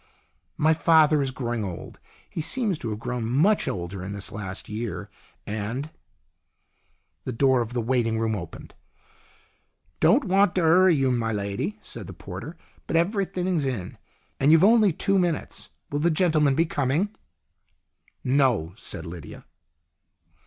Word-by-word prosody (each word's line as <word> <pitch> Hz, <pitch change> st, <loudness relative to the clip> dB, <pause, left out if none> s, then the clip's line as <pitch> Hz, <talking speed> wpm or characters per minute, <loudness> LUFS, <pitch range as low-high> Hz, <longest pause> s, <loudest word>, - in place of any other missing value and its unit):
" -, -, -46 dB
My 155 Hz, +1 st, +4 dB
father 155 Hz, -2 st, +4 dB
is 135 Hz, -, 0 dB
growing 120 Hz, -3 st, -3 dB
old. 90 Hz, -4 st, -7 dB, 0.3 s
He 160 Hz, -, -5 dB
seems 205 Hz, -, 0 dB
to 115 Hz, -, -4 dB
have 105 Hz, -, -3 dB
grown 120 Hz, +1 st, -4 dB
much 150 Hz, -, +2 dB
older 90 Hz, +1 st, -4 dB
in 100 Hz, +2 st, -5 dB
this 100 Hz, -1 st, -5 dB
last 95 Hz, -2 st, -6 dB
year, 110 Hz, +1 st, -5 dB, 0.3 s
and 110 Hz, +8 st, -4 dB, 0.6 s
" -, -, -46 dB
The -, -, -2 dB
door 130 Hz, +1 st, +3 dB
of 115 Hz, +1 st, -4 dB
the 120 Hz, -2 st, -1 dB
waiting 115 Hz, -2 st, +1 dB
room 110 Hz, 0 st, 0 dB
opened. 85 Hz, -5 st, -8 dB, 0.6 s
" -, -, -39 dB
Don't 275 Hz, +6 st, +4 dB
want 195 Hz, -2 st, +3 dB
to 185 Hz, -, +2 dB
'urry 175 Hz, +2 st, +5 dB
you, 135 Hz, -2 st, +2 dB
my 115 Hz, -2 st, 0 dB
lady," 105 Hz, -, -3 dB
said 115 Hz, -4 st, -6 dB
the 95 Hz, -, -8 dB
porter. 100 Hz, -, -8 dB
" -, -, -32 dB
But -, -, -2 dB
everything's 185 Hz, -2 st, 0 dB
in, 115 Hz, -9 st, -4 dB, 0.4 s
and 140 Hz, +3 st, +4 dB
you've 160 Hz, +2 st, +6 dB
only 215 Hz, -1 st, +6 dB
two 195 Hz, +4 st, +1 dB
minutes. 175 Hz, -4 st, -2 dB, 0.2 s
Will 145 Hz, -, -1 dB
the 170 Hz, +3 st, +3 dB
gentleman 155 Hz, -4 st, +3 dB
be 165 Hz, +3 st, +3 dB
coming? 150 Hz, +6 st, 0 dB, 0.4 s
" -, -, -48 dB
" -, -, -38 dB
No," 125 Hz, -, +2 dB
said -, -, -6 dB
Lydia. 80 Hz, -2 st, -9 dB
135 Hz, 165 wpm, -25 LUFS, 110-165 Hz, 0.6 s, you've